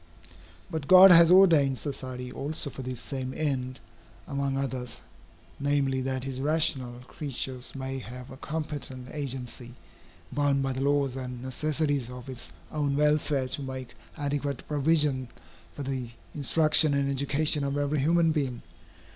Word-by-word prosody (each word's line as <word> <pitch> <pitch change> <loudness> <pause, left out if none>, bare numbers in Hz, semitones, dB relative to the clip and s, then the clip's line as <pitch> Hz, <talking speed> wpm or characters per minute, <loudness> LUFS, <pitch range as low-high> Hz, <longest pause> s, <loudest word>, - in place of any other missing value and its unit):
But 160 -4 -4
God 185 +1 +10
has 170 -1 +8
ordained 165 -8 +6
society 130 -3 -5
also 145 +2 -2
for 130 - -8
this 125 -2 -5
same 130 -2 -5
end, 130 -4 -1 0.5
among 140 -1 -1
others, 130 -3 -3 0.6
namely, 140 -2 +1
that 130 0 -2
his 135 -1 -4
rational 135 -5 0
creatures 130 -1 -4
may 135 0 -4
have 125 +2 -9
a 130 - -10
competent 145 -4 -5
agency, 125 -4 -5 0.6
bound 140 -1 +1
by 135 -1 -1
the 130 - -4
laws 140 -2 +1
and 125 -2 -6
necessities 145 -1 -1
of 125 +1 -9
its 120 -10 -7 0.2
own 145 -2 0
welfare 150 -2 +2
to 135 - -4
make 130 -3 -6 0.2
adequate 145 -2 -3
provision 145 -3 +2 0.5
for 145 - -5
the 130 -3 -3 0.2
instruction 155 0 +3
and 140 0 +1
education 140 +2 +1
of 140 0 -1
every 145 +1 0
human 165 +3 +3
being. 135 -6 -2
140 Hz, 140 wpm, -28 LUFS, 130-150 Hz, 0.6 s, God